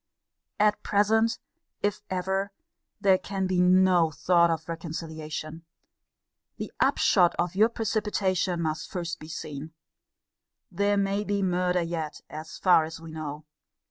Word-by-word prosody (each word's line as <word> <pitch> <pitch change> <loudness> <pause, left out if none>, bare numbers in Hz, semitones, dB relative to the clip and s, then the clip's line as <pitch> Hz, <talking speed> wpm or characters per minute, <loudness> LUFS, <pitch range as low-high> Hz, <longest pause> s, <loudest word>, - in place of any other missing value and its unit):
At 210 0 +3
present, 220 +2 +2 0.5
if 205 -1 0
ever, 190 +2 -1 0.5
there 190 -2 +4
can 195 -1 -3
be 185 -1 +1
no 180 -2 +5
thought 170 +2 +3
of 160 -1 -2
reconciliation. 160 -1 -6 0.9
The - - -6
upshot 180 -3 +4
of 175 -1 0
your 215 +4 +4
precipitation 195 -6 -1
must 155 -1 -3
first 175 -2 -4
be 155 - -10
seen. 155 -1 -7 1.0
There 205 0 +1
may 200 +1 0
be 200 -1 -1
murder 180 -1 +1
yet, 165 -2 -4
as 155 +1 -8
far 180 -4 +5
as 160 +1 -7
we 165 -1 -10
know. 155 -1 -6
180 Hz, 130 wpm, -27 LUFS, 160-195 Hz, 1.0 s, no